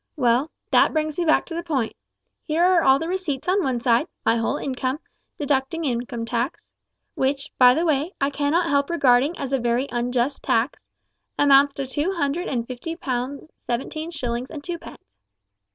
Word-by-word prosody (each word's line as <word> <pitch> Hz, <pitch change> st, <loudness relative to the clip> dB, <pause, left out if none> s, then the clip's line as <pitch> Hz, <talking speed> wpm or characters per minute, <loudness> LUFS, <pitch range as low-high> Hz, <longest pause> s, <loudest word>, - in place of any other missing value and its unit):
Well, 255 Hz, +1 st, +2 dB, 0.2 s
that -, -, +5 dB
brings 310 Hz, 0 st, -1 dB
me 345 Hz, -, +1 dB
back 315 Hz, -, +3 dB
to 335 Hz, -, -8 dB
the 335 Hz, -, -2 dB
point. 280 Hz, -10 st, -2 dB, 0.5 s
Here 320 Hz, +2 st, 0 dB
are 360 Hz, -1 st, +5 dB
all 265 Hz, -2 st, +5 dB
the 325 Hz, -, -4 dB
receipts 350 Hz, -7 st, -3 dB
on 380 Hz, +1 st, +2 dB
one 260 Hz, -4 st, 0 dB
side; 240 Hz, +5 st, +2 dB, 0.2 s
my 230 Hz, -, +4 dB
whole 230 Hz, -1 st, 0 dB
income, 260 Hz, 0 st, -2 dB, 0.4 s
deducting 285 Hz, +3 st, -1 dB
income 240 Hz, -2 st, -2 dB
tax 240 Hz, +5 st, -2 dB, 0.5 s
which, 275 Hz, +2 st, -1 dB
by 250 Hz, -1 st, +7 dB
the 330 Hz, +3 st, +1 dB
way, 305 Hz, +2 st, +1 dB
I 275 Hz, +1 st, +1 dB
cannot 300 Hz, +5 st, +1 dB
help 280 Hz, 0 st, +2 dB
regarding 280 Hz, -1 st, +3 dB
as 275 Hz, 0 st, -4 dB
a 270 Hz, -, +2 dB
very 240 Hz, +3 st, 0 dB
unjust 245 Hz, +2 st, -1 dB
tax 230 Hz, +5 st, 0 dB, 0.5 s
amounts 280 Hz, 0 st, +5 dB
to 275 Hz, -, -3 dB
two 295 Hz, +8 st, -1 dB
hundred 330 Hz, +1 st, -1 dB
and 235 Hz, -3 st, -2 dB
fifty 255 Hz, +7 st, -6 dB
pounds 265 Hz, -1 st, -4 dB
seventeen 275 Hz, +7 st, -4 dB
shillings 250 Hz, -5 st, -4 dB
and 295 Hz, -3 st, -8 dB
two 345 Hz, 0 st, -4 dB
pence. 100 Hz, -, -14 dB
275 Hz, 180 wpm, -23 LUFS, 245-320 Hz, 0.5 s, by